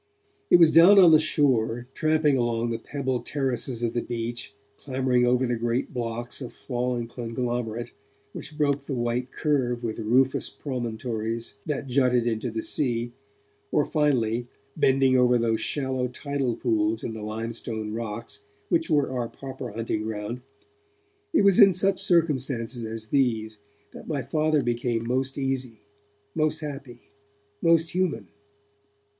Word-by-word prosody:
It - - +7
was 165 -2 +6
down 175 +5 +8
on 180 -4 +8
the 155 - +7
shore, 125 -6 +1
tramping 155 -2 +2
along 120 -1 0
the 115 - -2
pebbled 130 0 -3
terraces 130 -3 -2
of 115 - 0
the 120 - 0
beach, 115 -3 -5 0.2
clambering 130 -2 +1
over 125 +1 +3
the 120 -1 0
great 120 +3 -2
blocks 120 +1 -4
of 125 - -7
fallen 125 -1 -2
conglomerate 120 -1 -3 0.4
which 150 - -9
broke 140 -2 +1
the 140 - -3
white 120 +1 -2
curve 125 -6 0
with 115 -1 -3
rufous 125 +4 +2
promontories 115 -4 -4
that 145 -2 -2
jutted 125 -2 +2
into 115 +1 -1
the 110 0 -4
sea, 120 -4 -1 0.6
or, - - +2
finally, 125 -6 +1 0.3
bending 135 -1 +3
over 125 0 +4
those 115 -1 0
shallow 130 -3 -1
tidal 135 -1 -2
pools 110 -2 0
in 115 - -4
the 110 - -7
limestone 110 0 -5
rocks 115 0 -5 0.3
which 165 -1 +1
were 145 -4 +2
our 120 -3 -2
proper 130 -2 -7
hunting 110 0 -2
ground, 110 +2 -4 0.9
it 320 - +3
was 200 -2 +5
in 195 -1 +8
such 190 +1 +1
circumstances 135 -8 0
as 110 -1 -6
these 110 -6 0 0.3
that - - -11
my 145 -4 -2
Father 155 +1 +1
became 120 -1 -1
most 130 +2 -1
easy, 130 -4 -2 0.5
most 155 0 0
happy, 135 -5 -7 0.6
most 165 0 +3
human. 165 - -1
125 Hz, 145 wpm, -26 LUFS, 115-140 Hz, 0.9 s, down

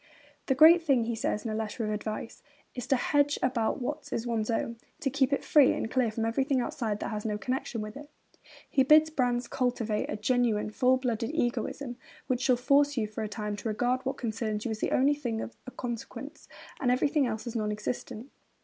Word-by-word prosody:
'The 265 - +2
great 325 +5 +8
thing,' 275 -7 +2
he 235 +1 -2
says 220 -1 -2
in 225 - -2
a - - -2
letter 220 +1 -3
of 215 - -2
advice, 215 +1 -5 0.3
'is 250 -1 -6
to 270 - +3
hedge 285 +3 +2
about 250 -1 +1
what 290 +3 -4
is 230 - -2
one's 230 -2 -1
own, 230 0 -1 0.2
to 285 -5 -1
keep 270 0 +2
it 280 - 0
free 290 -4 +5
and 225 - -3
clear 255 -3 +2
from 225 +1 -2
everything 265 +4 +1
outside 225 -3 -2
that - - -4
has 210 -1 -3
no 210 -2 -1
connexion 250 0 -3
with 215 0 -6
it.' 290 +1 -10 0.6
He 270 - +2
bids 305 +4 +6
Brandes 245 -4 0
cultivate 240 -4 -1
'a - - -2
genuine, 225 -2 +1
full 255 +3 +3
blooded 235 -3 -2
egoism, 245 -1 -2 0.3
which 255 -1 -1
shall 255 -1 +4
force 280 +3 +3
you 220 - +1
for 215 +1 -6
a - - -2
time 210 -1 -4
to 225 - -5
regard 245 +4 0
what 265 - -2
concerns 215 -2 -3
you 235 - -1
as 215 - -4
the - - -1
only 275 +3 +4
thing 240 -6 -3
of 230 - -6
any 255 - -9
consequence, 245 +5 -6 0.3
and 255 - +1
everything 275 +2 +2
else 220 0 -4
as 240 -1 -6
non 215 -2 0
existent.' 230 +3 -5
245 Hz, 215 wpm, -29 LUFS, 220-270 Hz, 0.6 s, great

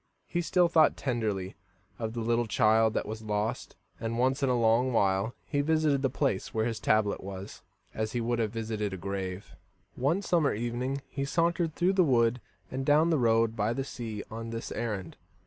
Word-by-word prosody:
He 175 - -1
still 175 +1 +3
thought 160 -3 +4
tenderly 105 -7 -2 0.4
of 110 -1 -3
the 115 - -3
little 120 +1 +1
child 110 0 +3
that - - 0
was 110 +1 -5
lost, 105 0 -2 0.2
and 115 0 -3
once 130 +3 +1
in 135 - +2
a 125 -1 +2
long 115 +3 +3
while 100 0 +1
he 145 -2 0
visited 155 -2 +2
the 135 - +2
place 130 -7 -1
where 110 0 +1
his 115 -2 -2
tablet 110 -1 +1
was, 95 +1 -8 0.3
as 110 0 -3
he 120 - 0
would 120 +1 -1
have 110 -2 +1
visited 110 -3 -3
a - - -4
grave. 95 +1 -5 0.4
One 155 +10 0
summer 165 - +2
evening 120 +4 -2
he 140 - -4
sauntered 165 +2 0
through 180 +2 +2
the 190 -1 +4
wood 120 -4 +2 0.3
and 130 +1 -3
down 150 +4 +4
the 155 - +2
road 115 -1 +3
by 110 +2 0
the 135 - -2
sea 115 -6 -6
on 115 +1 -5
this 115 0 -5
errand. 105 -7 -4
115 Hz, 195 wpm, -29 LUFS, 110-140 Hz, 0.4 s, thought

